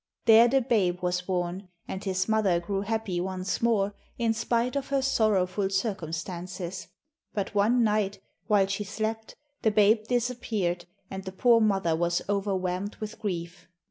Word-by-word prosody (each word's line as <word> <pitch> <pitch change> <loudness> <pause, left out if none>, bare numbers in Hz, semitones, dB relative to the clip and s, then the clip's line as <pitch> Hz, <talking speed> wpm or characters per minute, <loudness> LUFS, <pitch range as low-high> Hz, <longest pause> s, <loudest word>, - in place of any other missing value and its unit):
There 230 0 +8
the 265 +2 +3
babe 195 -8 +1
was 180 0 0
born, 180 +1 -3 0.2
and 190 - -5
his 190 -1 -1
mother 215 -6 +2
grew 195 +3 -2
happy 210 -4 -2
once 185 0 -3
more, 210 -4 +2 0.2
in 230 -2 +1
spite 235 +3 0
of 275 -1 -2
her 275 -1 +1
sorrowful 205 -6 +1
circumstances. 185 -2 -4 0.5
But 200 0 -2
one 225 +4 +3
night, 210 -2 +1 0.3
while 205 -3 +4
she 200 +2 -2
slept, 220 +2 -4 0.3
the 220 - +3
babe 215 +1 +3
disappeared, 225 -8 -1 0.3
and 190 0 -5
the 190 - -6
poor 230 +4 +4
mother 195 -6 +2
was 170 +1 0
overwhelmed 195 -1 -1
with 215 0 -7
grief. 180 -4 -5
200 Hz, 150 wpm, -27 LUFS, 185-220 Hz, 0.5 s, There